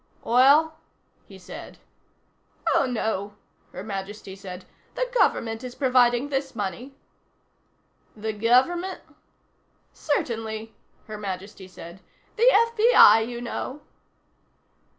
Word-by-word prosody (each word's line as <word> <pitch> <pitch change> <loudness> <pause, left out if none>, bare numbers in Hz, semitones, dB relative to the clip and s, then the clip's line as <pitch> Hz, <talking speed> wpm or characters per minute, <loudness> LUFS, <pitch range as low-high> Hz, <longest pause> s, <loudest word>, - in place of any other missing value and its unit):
"Oil?" 290 +6 +4 0.5
he - - -13
said. - - -11 1.0
"Oh, 275 - +2
no," 215 -4 -3 0.4
Her 185 - -8
Majesty 200 -1 -7
said. 185 -2 -9 0.3
"The - - -1
Government 225 - +1
is 250 -1 -7
providing 250 0 +2
this 270 -2 -3
money." 230 +6 -5 1.2
"The 220 +1 -3
Government?" 260 - +1 0.9
"Certainly," 225 -6 -3 0.3
Her 215 -1 -8
Majesty 195 -1 -7
said. 175 0 -12 0.4
"The 475 +2 +5
FBI, 455 - +6
you 240 -1 -6
know." 260 +4 -5
230 Hz, 95 wpm, -25 LUFS, 205-275 Hz, 1.2 s, FBI